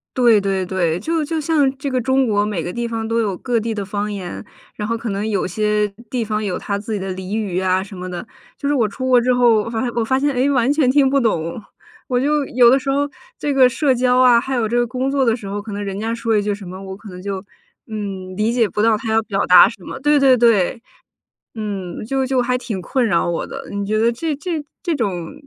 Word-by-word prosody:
对 235 -5 +5
对 195 -1 -1
对， 175 -3 0
就 320 - -1
就 315 +2 -2
像 300 -3 +2
这 275 +1 -3
个 255 -1 0
中 260 +1 +2
国 205 -1 +2
每 205 -6 -2
个 175 - -5
地 240 0 -2
方 225 -1 -3
都 230 +1 0
有 205 -5 -1
各 240 +2 0
地 225 +1 -3
的 205 -2 -4
方 205 +1 -3
言， 190 -3 -6 0.3
然 210 - -4
后 230 +1 -1
可 230 0 -5
能 200 +2 -2
有 205 -3 0
些 210 +3 0 0.2
地 245 -3 -2
方 215 0 -2
有 190 -3 -2
它 200 - -3
自 215 +2 -5
己 205 - -1
的 190 0 -4
俚 190 +3 -5
语 200 -5 -2
呀 185 0 +1
什 195 0 -11
么 185 0 -6
的。 180 +5 -6 0.3
就 280 - -3
是 290 - +2
我 240 -6 +2
出 260 +5 -5
国 250 -1 +5
之 250 +1 +2
后， 245 -2 +4
我 - - -6
发 225 -1 -2
现 255 - -1
我 235 - +1
发 260 +3 +1
现 290 +1 +1
哎， 255 +2 +2
完 260 -1 +2
全 295 -4 +2
听 270 0 +4
不 275 +1 +2
懂。 170 -5 -1 0.5
我 250 -1 +1
就 295 +2 +1
有 240 -2 +5
的 265 - +4
时 270 - -4
候 285 +1 +1 0.3
这 290 - -1
个 260 -2 +6
社 275 +2 +1
交 250 0 +2
啊， 245 -2 +6
还 265 +2 -3
有 230 -3 +1
这 235 - -2
个 240 - +3
工 260 +3 -2
作 275 -1 +2
的 230 -2 +3
时 220 - -10
候， 205 +1 -4
可 210 +1 -9
能 205 +1 -4
人 195 -1 -4
家 225 +2 -2
说 230 -1 0
一 210 - +3
句 205 0 -1
什 200 -1 -11
么， 185 +2 -8
我 190 0 -7
可 215 - -13
能 180 -1 -9
就， 195 -1 -4 0.4
嗯， 195 -5 -6
理 215 +3 +1
解 235 -2 +2
不 205 +2 -2
到 220 0 +4
他 220 0 -4
要 225 - +4
表 200 -3 -1
达 180 +2 +8
什 220 -5 -12
么 - - -7
对 295 +1 +3
对 270 -2 +6
对， 230 -2 +3 0.7
嗯， 200 -5 -5
就 265 +3 0
就 260 -1 +1
还 250 +1 0
挺 215 -7 -5
困 255 +7 0
扰 175 -6 +1
我 170 - -2
的。 - - -8
你 200 0 -3
觉 215 +2 0
得 230 +1 +4
这 300 +7 -2
这 325 -2 -3 0.2
这 335 -3 -1
种 185 -9 -3
225 Hz, 285 characters per minute, -19 LUFS, 200-255 Hz, 0.7 s, 达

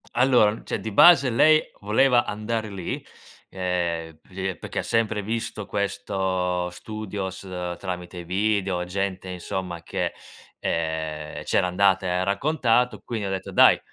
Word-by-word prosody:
Allora, 120 -4 +4
cioè, - - -2
di 110 - -4
base 140 - +7
lei 155 +6 +5 0.2
voleva 120 +4 +3
andare 110 +1 -3
lì, 95 -4 -5 0.4
ehm, 85 -3 -2
li 95 +1 -3
è 95 - -4
perché - - -4
sempre 110 -2 0
visto 110 -1 -3
questo 95 -3 -1
studios 95 0 -6 0.4
tramite 90 -1 -6
video, 95 -1 0
gente 95 0 -3
insomma 90 -1 -5
che, - - -2 0.5
ehm, 80 -2 -3
c'era 90 - +2
andata 95 0 +3
e - - 0
ha 90 +1 +1
raccontato. 120 +1 +1
Quindi 110 -4 -3
ho - - -3
detto: 95 -1 -4
"Dai, - - +7
95 Hz, 135 wpm, -25 LUFS, 90-110 Hz, 0.5 s, base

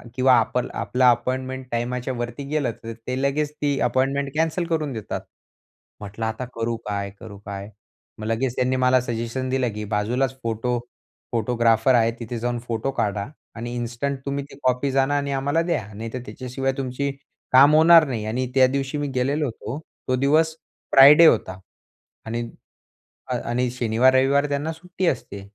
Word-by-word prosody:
किंवा 130 0 +4
आपल 120 +2 -1
आपला 125 0 +3
अपॉइंटमेंट 130 +2 -1
टाईमाच्यावरती 120 +1 -3
गेलं, 145 -5 0
तर 115 0 -5
ते 130 +1 -2
लगेच 145 +2 0
ती 145 -2 +1
अपॉइंटमेंट 135 +3 +1
कॅन्सल 160 +2 0
करून 155 -4 -1
देतात. 110 -3 -5 0.8
म्हटलं 105 +2 -5
आता 110 +3 -3
करू 115 0 -1
काय, 100 -1 -2
करू 100 -2 -10
काय? 100 0 -6 0.5
मग 110 - -6
लगेच 120 +2 -1
त्यांनी 130 +1 +1
मला 130 0 +4
सजेशन 120 +2 -3
दिलं, 130 -2 +1
की 105 0 -5
बाजूलाच 125 +6 0
फोटो 115 +2 -1 0.5
फोटोग्राफर 115 0 +2
आहे. 115 -1 +3
तिथे 120 +1 -5
जाऊन 120 +1 -2
फोटो 115 +3 -2
काढा 100 -2 -1 0.3
आणि 120 +1 -5
इन्स्टंट 120 +3 -3
तुम्ही 140 0 -2
ती - - -12
कॉपीज 130 +2 +1
जाणा 135 +1 +2
आणि 140 0 -2
आम्हाला 140 +4 +1
द्या. 170 - -1
नाहीतर 115 +4 -5
त्याच्याशिवाय 135 +1 -3
तुमची 135 +1 -2 0.4
काम 140 +4 +7
होणार 165 +1 +7
नाही 115 -5 -3
आणि 125 +4 -2
त्या 130 -1 +6
दिवशी 135 +2 -2
मी 145 - -2
गेलेलो 140 +4 +1
होतो. 125 +2 -5 0.3
तो 130 - +2
दिवस 155 +5 +2 0.4
फ्रायडे 145 +5 +9
होता. 95 - +3 0.7
आणि 115 +1 -3 0.9
अ, - - -1
आणि 125 +1 0
शनिवार, 125 +1 +3
रविवार 140 +2 +3
त्यांना 145 +3 -1
सुट्टी 180 +2 -4
असते. 110 -7 -2
130 Hz, 160 wpm, -23 LUFS, 115-140 Hz, 0.9 s, फ्रायडे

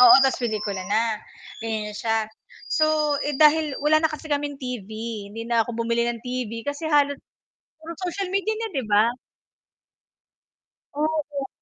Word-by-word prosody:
oo, 250 -1 +10
ta's 265 - +2
pelikula 210 -4 -2
na, 220 +1 +1 0.4
ganiyan 215 -2 -3
na - - -11
siya. 225 0 +1 0.5
So, 310 -2 +3
eh, 295 -1 -1
dahil 305 -1 +4
wala 310 +1 +5
na 320 - +3
kasi 305 - -7
kaming 290 0 -1
TV, 250 -6 -5 0.4
hindi 225 +1 -5
na 235 -1 +3
ako 240 - -6
bumili 235 0 +1
ng 235 -1 -4
TV 240 -3 -4
kasi 285 +3 -3
halos 285 -2 +3 0.6
puro 325 +1 -8
social 365 +1 -2
media 395 +3 +1
na, 455 - -2
'di 265 -5 -1
ba? 215 +3 +4 1.8
Oo, 310 +2 +1
nga. 285 -2 -4
270 Hz, 160 wpm, -24 LUFS, 230-305 Hz, 1.8 s, oo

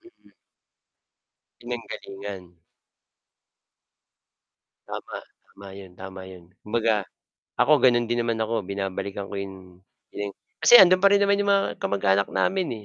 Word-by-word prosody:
Mm. 350 +1 -23 1.3
Pinanggalingan. 100 -5 -7 2.4
Tama, - - -7 0.3
tama 100 - -14
'yon, 95 -2 -12
tama 95 0 -10
'yon. 90 -2 -13 0.2
Kumbaga, 110 -2 0 0.5
ako 155 - +4
gano'n 120 -2 +4
din 120 0 0
naman 115 -1 -2
ako, 110 -1 -2
binabalikan 100 +1 -5
ko - - -7
yung, 100 -1 -6 0.5
pinang 100 -1 -6 0.3
kasi, 240 - +9
ando'n 185 -1 +7
pa 200 - +6
rin 200 - +4
naman 200 0 +3
yung 205 0 +1
mga 195 0 +3
kamag-anak 100 0 +1
namin, 185 - 0
eh, 110 -3 -8
105 Hz, 125 wpm, -24 LUFS, 100-125 Hz, 2.4 s, kasi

